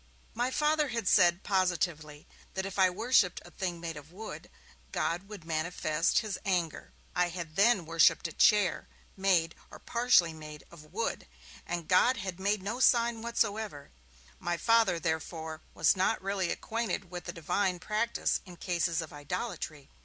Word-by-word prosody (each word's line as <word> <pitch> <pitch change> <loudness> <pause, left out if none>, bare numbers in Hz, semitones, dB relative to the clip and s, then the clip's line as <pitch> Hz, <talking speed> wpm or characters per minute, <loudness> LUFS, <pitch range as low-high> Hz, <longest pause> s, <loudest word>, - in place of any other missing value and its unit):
My 245 +3 0
Father 300 +2 +2
had 230 -6 -3
said, 175 -2 +4
positively, 170 -6 -1 0.3
that 190 0 -2
if 195 0 -5
I 185 -1 +6
worshipped 205 -1 +2
a 175 - -13
thing 175 -2 -4
made 165 -1 -5
of 150 +2 -12
wood, 215 +5 -8 0.4
God 175 +4 -2
would 200 -6 -9
manifest 160 0 0
his 210 - -3
anger. 175 -5 -1 0.2
I 180 0 +2
had 170 -3 -7
then 200 -2 +4
worshipped 165 +1 +4
a - - -9
chair, 205 -5 +3 0.3
made 180 -4 +2 0.2
(or - - -11
partly 235 -9 +3
made) 150 -1 -10
of 155 -2 -14
wood, 225 +5 -3 0.4
and 170 -2 -3
God 240 +8 +4
had 190 -2 -5
made 200 0 0
no 220 +5 -3
sign 235 -3 +3
whatever. 220 -9 -2 0.5
My 175 0 -2
Father, 225 -3 +3
therefore, 160 -1 -3
was - - +4
not 190 0 +1
really 195 -2 -1
acquainted 225 -5 -3
with 180 -1 -6
the 175 - -4
Divine 180 +3 0
practice 215 +6 -1
in 180 -2 -12
cases 170 -2 0
of 155 - -11
idolatry. 155 - -5
180 Hz, 160 wpm, -30 LUFS, 165-210 Hz, 0.5 s, I